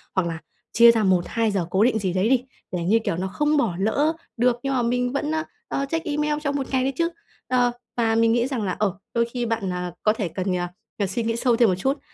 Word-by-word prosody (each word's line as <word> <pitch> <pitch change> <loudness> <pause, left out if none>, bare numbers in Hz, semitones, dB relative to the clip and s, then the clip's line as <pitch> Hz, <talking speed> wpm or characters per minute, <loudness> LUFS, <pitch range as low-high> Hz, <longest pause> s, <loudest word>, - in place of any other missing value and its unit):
hoặc 185 -3 +2
là 165 -1 -4 0.3
chia 235 +1 +8
ra 225 -2 +1
1-2 190 +4 +1
giờ 190 -4 0
cố 190 +3 +3
định 225 -2 +3
gì 190 -3 -1
đấy 190 +5 +1
đi, 255 -2 +3 0.3
để, 180 -2 -2
như 215 +6 +3
kiểu, 170 -6 -2
nó 190 - -2
không 295 +10 +1
bỏ 225 -11 +1
lỡ 285 +10 +2 0.2
được 245 0 +2
nhưng 275 0 -1
mà 250 - +1
mình 245 +1 0
vẫn, 295 +2 -1
a, 315 - 0 0.3
à, 275 - -1
check 325 +4 -3
email 300 0 0
trong 285 -1 -1
một 270 -2 -2
ngày 260 -1 +2
đấy 270 +1 0
chứ. 335 0 +2 0.4
Ờ, 245 -1 +3 0.3
và 225 -1 +2
mình 230 0 +4
nghĩ 240 +1 +2
rằng 255 -6 -2
là, 185 -3 -1
ờ, 200 -3 0 0.2
đôi 235 0 +2
khi 245 -1 -1
bạn, 225 -5 -1
à, 180 -1 -3
có 215 - +4
thể 215 -4 -2
cần, 185 +2 -2
à, 175 - -1
ờ, - - -7 0.3
cần 200 - +1
suy 225 +5 -2
nghĩ 230 0 -1
sâu 235 0 +2
thêm 235 -3 +5
một 185 - +2
chút, 270 +10 -1
230 Hz, 270 wpm, -24 LUFS, 190-260 Hz, 0.4 s, chia